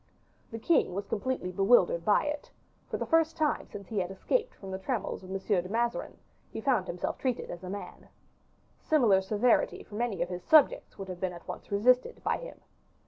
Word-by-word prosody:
The 225 - -6
king 225 - +2
was 200 +1 -3
completely 215 -4 -2
bewildered 190 -3 +4
by 205 - +4
it; 295 0 -4 0.4
for - - -2
the - - -3
first 325 -1 +2
time 305 -2 0
since 200 -2 -9
he 215 - -1
had 180 -1 -1
escaped 460 - -1
from 195 -1 -9
the 190 - -4
trammels 220 +2 -3
of 185 - -11
M. 195 - -2
de 190 -2 0
Mazarin, 235 +2 -1 0.3
he - - -6
found 225 -6 +1
himself 175 - -3
treated 255 -3 -2
as 175 +1 -8
a 180 - -6
man. 200 +1 -8 0.7
Similar 230 -11 +4
severity 215 +5 +2
from 210 +2 -6
any 205 -8 0
of 175 - -6
his 180 -1 -5
subjects 310 -3 +4
would 195 - -6
have 180 -1 -7
been 185 -1 -2
at 170 - -12
once - - -8
resisted 250 - +2
by - - +1
him. - - -10
205 Hz, 200 wpm, -29 LUFS, 190-255 Hz, 0.7 s, bewildered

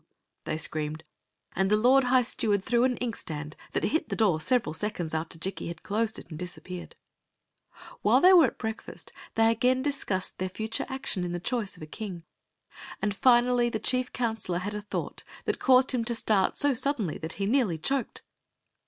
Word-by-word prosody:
they - - -2
screamed; 155 0 -3 0.5
and 190 +1 +2
the 210 - +4
lord 255 +4 +5
high 250 0 +4
steward 205 -4 0
threw 240 +2 +2
an 250 -1 0
inkstand 155 -10 -5 0.2
that - - 0
hit 315 0 0
the - - -1
door 190 -8 +2
several 245 +2 +1
seconds 175 -3 -3
after 160 +1 -3
Jikki 190 +3 -4
had 170 -1 -7
closed 220 +2 0
it - - -10
and 155 - -7
disappeared. 180 0 -7 1.1
While - - +5
they 370 +1 +7
were 345 -3 +8
at - - -7
breakfast 220 -1 -6 0.2
they 225 0 +5
again 250 +3 +2
discussed 240 -10 -2
their 185 0 -1
future 220 +4 -3
action 265 -8 -3
in 175 -1 -3
the 175 - -2
choice 225 +1 -2
of - - -10
a - - -5
king; 180 +1 -7 0.8
and 205 - 0
finally 240 +1 +4
the 225 - -2
chief 255 +3 +1
counselor 225 -7 -2
had 200 +4 -4
a 210 - -4
thought 205 - -5 0.2
that - - -1
caused 260 0 +5
him 250 -3 0
to 235 0 +1
start 210 -4 +1
so 285 -1 +3
suddenly 250 - -1
that 160 0 -4
he 195 - -2
nearly 220 -7 +2
choked. 270 - -2
220 Hz, 190 wpm, -28 LUFS, 180-250 Hz, 1.1 s, were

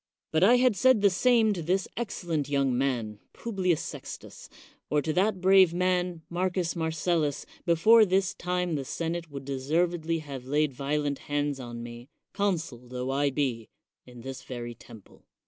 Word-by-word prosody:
But 160 - +2
had 245 +5 +6
I - - -7
said 255 +2 +4
the 200 - +6
same 225 +2 +3
to 180 - -4
this 180 +4 0
excellent 170 - -3
young 140 -3 +1
man, 120 -5 -1
Publius 185 -7 -1
Sextius, - - -9 0.4
or 150 - +2
to 155 +2 -1
that 190 +2 +1
brave 190 -2 +6
man, 180 -2 0
Marcus 180 0 -1
Marcellus, 160 -2 -1 0.2
before 215 +7 +6
this 190 -1 +1
time 180 -1 -2
the 140 -3 -1
senate 165 +4 -4
would 140 -2 -8
deservedly 160 +5 0
have 140 -5 -8
laid 150 +1 +1
violent 140 +1 -1
hands 145 -1 -1
on 120 -2 -7
me, 120 +2 -10 0.2
consul 160 -11 -2
tho 125 +1 -4
I 140 +1 +2
be, 130 -5 -2 0.4
in 125 -1 -12
this 135 +1 -7
very 120 -2 -6
temple. 110 -2 -16
160 Hz, 160 wpm, -28 LUFS, 135-180 Hz, 0.4 s, had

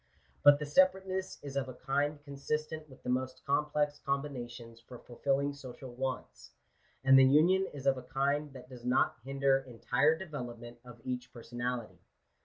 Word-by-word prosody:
But 145 0 +8
the 150 - -4
separateness 185 +4 +2
is 140 -1 -7
of 135 -1 -1
a 130 - -8
kind 145 +3 0
consistent 150 +2 -4
with 130 - -16
the - - -4
most 130 0 -2
complex 150 +1 +1
combinations 120 -5 -4
for 125 +1 -11
fulfilling* 140 +4 -1
social 130 -2 -10
wants; 130 +1 -5 0.5
and 135 0 +8
the - - +8
union 170 +8 +5
is 140 -2 -9
of 135 -1 +4
a 125 0 -14
kind 140 +2 0
that 125 -1 -11
does 125 -2 -11
not 125 +2 +2
hinder] 135 0 +2
entire 135 +4 +1
development 120 -8 -7
of 120 -2 -13
each 125 -1 -4
personality. 120 0 -5
135 Hz, 160 wpm, -32 LUFS, 125-145 Hz, 0.5 s, But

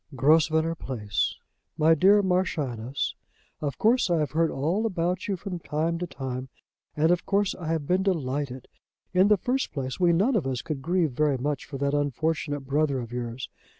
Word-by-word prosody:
"GROSVENOR 160 +3 +3
PLACE. 105 - -2 0.4
"MY 160 +1 +5
DEAR 195 +5 +5
MARCHIONESS, 140 - -1 0.5
Of 145 -3 -3
course 230 -1 +3
I 170 - +3
have 150 -2 0
heard 165 +1 +2
all 175 +11 0
about 180 -2 -1
you 195 -2 -1
from 180 -1 -5
time 165 +2 -1
to 180 - -3
time, 130 -3 -5 0.5
and 160 +3 +4
of 175 -1 +1
course 200 -1 +2
I 165 - -7
have 160 -2 -1
been 180 +5 +2
delighted. 140 -8 -2 0.5
In 185 +2 +5
the 210 0 +5
first 255 +8 -1
place, 130 +1 -4
we 175 -2 +4
none 205 +10 +2
of 170 -11 +1
us 130 -2 -2
could 155 -4 -4
grieve 170 0 +1
very 145 +1 +1
much 140 +1 -2
for 140 - -7
that 140 +1 0
unfortunate 145 +1 -1
brother 140 0 0
of 120 -1 -6
yours. 120 0 -4
155 Hz, 185 wpm, -26 LUFS, 135-180 Hz, 0.5 s, MY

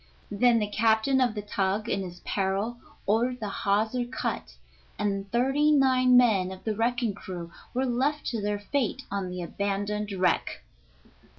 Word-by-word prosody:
Then 235 +3 +4
the 215 - +1
captain 220 +5 +2
of 240 -3 +2
the 210 - -4
tug, 200 +1 -1
in 195 - 0
his 180 -2 -8
peril, 200 +4 -1 0.3
ordered 240 +4 +1
the 210 -3 -3
hawser 215 +5 0
cut, 245 +2 -4 0.4
and 195 -1 -2
thirty 270 +5 +3
nine 255 -3 +5
men 205 -7 +4
of 190 0 -10
the 220 -1 -1
wrecking 235 0 0
crew 175 -3 -7 0.2
were 260 +1 +1
left 270 +5 0
to 230 -3 -2
their 205 0 -1
fate 260 +4 -2
on 195 -2 -2
the 180 0 -5
abandoned 205 +3 -2
wreck. 185 -2 0
215 Hz, 160 wpm, -27 LUFS, 200-245 Hz, 0.4 s, nine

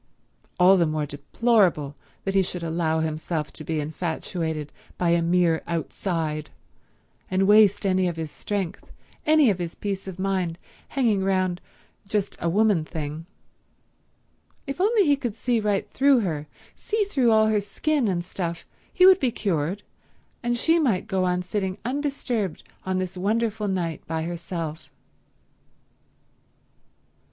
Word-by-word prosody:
All 185 +2 +7
the 170 -2 +3
more 155 -1 -1
deplorable 150 - +1 0.3
that 195 - -2
he 195 - +4
should 180 -2 -3
allow 160 -1 0
himself 155 0 -3
to 155 - -8
be 160 0 -2
infatuated 160 0 -3 0.3
by 175 -1 +2
a 170 0 +3
mere 170 -1 +2
outside, 160 -2 -2 0.8
and 190 +1 +2
waste 210 -1 +5
any 185 -1 +2
of 175 - -2
his 160 -2 -5
strength, 195 -3 -4 0.4
any 305 -6 +6
of 190 - -3
his 175 -1 -4
peace 195 -2 -4
of 185 -2 -6
mind, 185 -3 -1 0.3
hanging 225 -8 +1
round 185 -2 0 0.5
just 200 -1 -1
a 170 - +1
woman 205 -2 +3
thing. 155 0 -6 1.4
If 275 +4 -4
only 420 0 +4
he 290 -2 +4
could 240 -6 -4
see 240 0 0
right 210 -2 0
through 275 -2 +4
her, 155 -6 -3 0.3
see 430 0 -1
through 275 - +2
all 220 -1 +5
her 210 -1 +2
skin 275 +6 0
and 175 -3 -1
stuff, 170 -2 -4 0.3
he 365 - +5
would 380 0 +8
be 260 - +2
cured, 190 -2 -1 0.6
and 240 0 0
she 325 +7 +3
might 230 - +1
go 190 -4 0
on 180 0 0
sitting 190 0 -2
undisturbed 250 - -2 0.2
on 185 0 0
this 185 0 -3
wonderful 215 +2 0
night 175 -5 -2
by 160 0 -2
herself. 165 -2 -5
185 Hz, 145 wpm, -25 LUFS, 165-220 Hz, 1.4 s, would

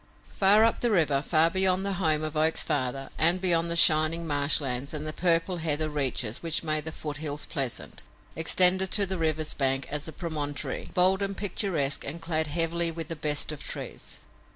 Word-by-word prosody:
Far 205 +2 +5
up 230 - +1
the 240 - 0
river, 155 -9 +2
far 160 +2 +2
beyond 190 0 +1
the 200 - -2
home 155 -2 +2
of 155 0 -4
Oak's 160 +1 +2
father 135 +1 -3
and 170 +3 +2
beyond 170 -2 +1
the 170 - -1
shining 160 0 +4
marshlands 140 -2 0
and 150 0 -5
the 155 - -4
purple 175 +1 +1
heather 155 -1 -1
reaches 130 -5 -2
which 165 -1 0
made 155 -1 -1
the 160 - -5
foothills 150 -1 -4
pleasant, 135 -4 -4 0.3
extended 185 +3 +4
to 205 - +6
the 190 -1 -4
river's 155 -1 -1
bank 135 -1 -1
a 150 - -1
promontory, 150 -4 -4
bold 185 +2 +3
and 195 0 -3
picturesque 175 -8 -2
and 155 +4 -6
clad 160 -2 -1
heavily 165 +2 0
with 165 -1 -7
the 165 - -4
best 150 0 -1
of 150 - -7
trees. - - -7
160 Hz, 180 wpm, -26 LUFS, 150-175 Hz, 0.3 s, to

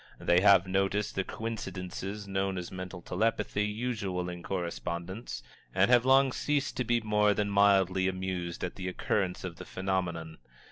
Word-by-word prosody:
They 85 +1 +3
have 100 -2 +6
noticed 95 +2 0
the 95 - 0
coincidences 100 -2 -5
known 95 -1 -1
as 90 -1 -5
mental 90 -1 -7
telepathy 105 -2 0
usual 105 -5 -2
in 90 -1 -6
correspondence, 85 - -4 0.3
and - - +4
have 120 0 +6
long 135 0 +5
ceased 145 +1 -1
to 125 - +1
be 120 0 +1
more 105 -1 +3
than 105 0 0
mildly 95 -2 +4
amused 95 -2 -3
at 90 - -4
the 95 -1 -4
occurrence 90 0 -1
of 90 -2 -6
the - - -8
phenomenon. 90 -4 -3
95 Hz, 155 wpm, -30 LUFS, 90-105 Hz, 0.3 s, have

